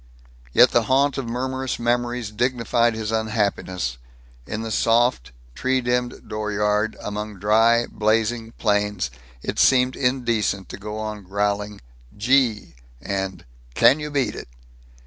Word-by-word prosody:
Yet -, -, +6 dB
the -, -, +2 dB
haunt 140 Hz, +1 st, +3 dB
of 120 Hz, -4 st, -4 dB
murmurous 130 Hz, +1 st, -2 dB
memories 120 Hz, -1 st, -1 dB
dignified 120 Hz, 0 st, +1 dB
his 110 Hz, 0 st, -3 dB
unhappiness. 100 Hz, -, -1 dB, 0.5 s
In 110 Hz, +1 st, -4 dB
the 115 Hz, -, -5 dB
soft, 115 Hz, -, +2 dB, 0.2 s
tree 130 Hz, -, 0 dB
dimmed 125 Hz, 0 st, -2 dB
dooryard 105 Hz, 0 st, -1 dB
among 105 Hz, 0 st, -5 dB
dry, 115 Hz, +4 st, +4 dB
blazing 115 Hz, +1 st, 0 dB
plains 105 Hz, -, 0 dB, 0.3 s
it -, -, -3 dB
seemed 125 Hz, 0 st, +4 dB
indecent 120 Hz, -6 st, 0 dB
to -, -, -7 dB
go 105 Hz, +2 st, -6 dB
on 110 Hz, -1 st, -5 dB
growling 100 Hz, +2 st, -2 dB, 0.4 s
"Gee," 120 Hz, -1 st, +2 dB, 0.3 s
and 95 Hz, +2 st, -4 dB, 0.3 s
"Can 145 Hz, -, +5 dB
you 150 Hz, 0 st, -4 dB
beat 140 Hz, -3 st, 0 dB
it?" -, -, -8 dB
110 Hz, 125 wpm, -23 LUFS, 105-125 Hz, 0.5 s, Yet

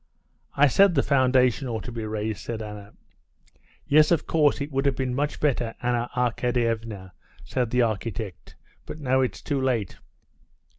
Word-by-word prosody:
"I 145 Hz, -, +6 dB
said 185 Hz, +6 st, +4 dB
the 140 Hz, -, +3 dB
foundation 130 Hz, -1 st, +2 dB
ought 115 Hz, -2 st, -4 dB
to 125 Hz, -, -7 dB
be 115 Hz, -2 st, -5 dB
raised," 110 Hz, -1 st, -3 dB
said 115 Hz, -2 st, -5 dB
Anna. 105 Hz, -1 st, -9 dB, 0.9 s
"Yes, 150 Hz, +1 st, +5 dB
of 170 Hz, -4 st, +2 dB
course 150 Hz, -3 st, +2 dB
it 145 Hz, +1 st, -4 dB
would 135 Hz, +1 st, 0 dB
have 135 Hz, -, +1 dB
been 130 Hz, -1 st, -2 dB
much 145 Hz, +3 st, -2 dB
better, 120 Hz, -6 st, 0 dB
Anna 120 Hz, -1 st, -1 dB
Arkadyevna," 115 Hz, -5 st, -1 dB, 0.3 s
said 125 Hz, -3 st, -2 dB
the 125 Hz, +1 st, +2 dB
architect, 110 Hz, -3 st, -4 dB, 0.3 s
"but 155 Hz, -, -7 dB
now 130 Hz, -2 st, +2 dB
it's 130 Hz, -, -2 dB
too 140 Hz, -3 st, -1 dB
late." 120 Hz, -7 st, -1 dB
125 Hz, 160 wpm, -25 LUFS, 115-140 Hz, 0.9 s, I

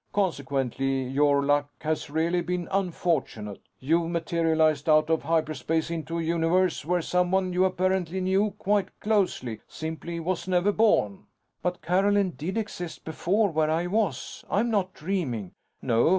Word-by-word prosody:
Consequently, 135 Hz, -, 0 dB
your 140 Hz, +2 st, +2 dB
luck 145 Hz, 0 st, +2 dB
has 155 Hz, 0 st, -2 dB
really 165 Hz, +4 st, +1 dB
been 180 Hz, 0 st, -3 dB
unfortunate. 165 Hz, -, -1 dB, 0.2 s
You've 165 Hz, +5 st, +1 dB
materialized 160 Hz, -2 st, +1 dB
out 155 Hz, +1 st, +4 dB
of 160 Hz, -, +2 dB
hyperspace 160 Hz, 0 st, 0 dB
into 165 Hz, 0 st, -3 dB
a 165 Hz, -, -1 dB
universe 170 Hz, +2 st, +1 dB
where 175 Hz, +2 st, 0 dB
someone 180 Hz, +1 st, +1 dB
you 185 Hz, +1 st, +3 dB
apparently 185 Hz, -1 st, 0 dB
knew 190 Hz, +3 st, +2 dB
quite 200 Hz, -1 st, 0 dB
closely 180 Hz, -, 0 dB
simply 160 Hz, +2 st, -5 dB
was 175 Hz, +1 st, -2 dB
never 185 Hz, +2 st, +3 dB
born." 205 Hz, -, +2 dB, 0.3 s
"But 180 Hz, 0 st, -2 dB
Carolyn 195 Hz, +2 st, +2 dB
did 175 Hz, +6 st, -4 dB
exist 180 Hz, -6 st, -5 dB
before... 190 Hz, +6 st, +1 dB
where 155 Hz, -1 st, +1 dB
I 165 Hz, +2 st, +1 dB
was? 210 Hz, +3 st, -2 dB
I'm 230 Hz, +4 st, +1 dB
not 190 Hz, -3 st, 0 dB
dreaming." 145 Hz, -, -3 dB, 0.3 s
"No. 115 Hz, +4 st, +3 dB
170 Hz, 140 wpm, -27 LUFS, 155-185 Hz, 0.3 s, out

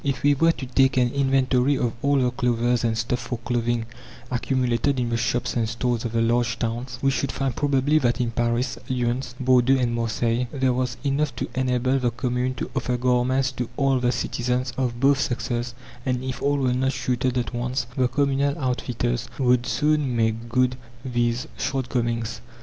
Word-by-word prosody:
If 135 Hz, -3 st, -2 dB
we 145 Hz, 0 st, +5 dB
were 165 Hz, +4 st, +4 dB
to 135 Hz, -, -6 dB
take 130 Hz, +1 st, +2 dB
an 125 Hz, -1 st, +3 dB
inventory 135 Hz, 0 st, +2 dB
of 120 Hz, -2 st, 0 dB
all 140 Hz, 0 st, +2 dB
the 125 Hz, -2 st, +2 dB
clothes 120 Hz, -1 st, +1 dB
and 115 Hz, -1 st, +1 dB
stuff 120 Hz, +2 st, -1 dB
for 120 Hz, +1 st, -4 dB
clothing 120 Hz, -1 st, -1 dB, 0.5 s
accumulated 125 Hz, +1 st, 0 dB
in 120 Hz, -1 st, 0 dB
the -, -, +1 dB
shops 120 Hz, +1 st, -1 dB
and 115 Hz, -2 st, 0 dB
stores 120 Hz, 0 st, -1 dB
of 115 Hz, -, -3 dB
the 115 Hz, 0 st, +2 dB
large 115 Hz, 0 st, +1 dB
towns, 120 Hz, +1 st, -3 dB
we 135 Hz, -, +4 dB
should 135 Hz, +1 st, -1 dB
find 135 Hz, -3 st, -2 dB
probably 145 Hz, +1 st, +2 dB
that 120 Hz, -2 st, +1 dB
in 120 Hz, -2 st, 0 dB
Paris, 120 Hz, +2 st, -1 dB
Lyons, 125 Hz, 0 st, -1 dB
Bordeaux, 130 Hz, 0 st, +4 dB
and 120 Hz, -2 st, 0 dB
Marseilles, 115 Hz, +1 st, 0 dB
there 130 Hz, -3 st, +1 dB
was 125 Hz, -1 st, -1 dB
enough 140 Hz, -1 st, 0 dB
to -, -, -3 dB
enable 130 Hz, +1 st, +1 dB
the 125 Hz, -2 st, +1 dB
commune 125 Hz, +1 st, -1 dB
to -, -, -5 dB
offer 125 Hz, -2 st, 0 dB
garments 125 Hz, +1 st, +2 dB
to 125 Hz, -2 st, -4 dB
all 135 Hz, -2 st, +2 dB
the 125 Hz, 0 st, +2 dB
citizens, 125 Hz, 0 st, -1 dB
of 125 Hz, -3 st, -2 dB
both 135 Hz, +1 st, +4 dB
sexes; 120 Hz, -2 st, -2 dB, 0.3 s
and 125 Hz, -1 st, -1 dB
if 130 Hz, -2 st, -4 dB
all 145 Hz, 0 st, +2 dB
were 130 Hz, -2 st, +1 dB
not 130 Hz, +2 st, +1 dB
suited 125 Hz, 0 st, -1 dB
at 125 Hz, 0 st, -2 dB
once, 125 Hz, +1 st, -1 dB
the 130 Hz, -2 st, +2 dB
communal 140 Hz, +2 st, +1 dB
outfitters 125 Hz, -3 st, -2 dB
would 125 Hz, -2 st, +2 dB
soon 150 Hz, -3 st, +1 dB
make 115 Hz, 0 st, 0 dB
good 125 Hz, +1 st, +2 dB, 0.3 s
these 120 Hz, +1 st, 0 dB
shortcomings. 120 Hz, -4 st, -2 dB
125 Hz, 185 wpm, -24 LUFS, 120-130 Hz, 0.5 s, we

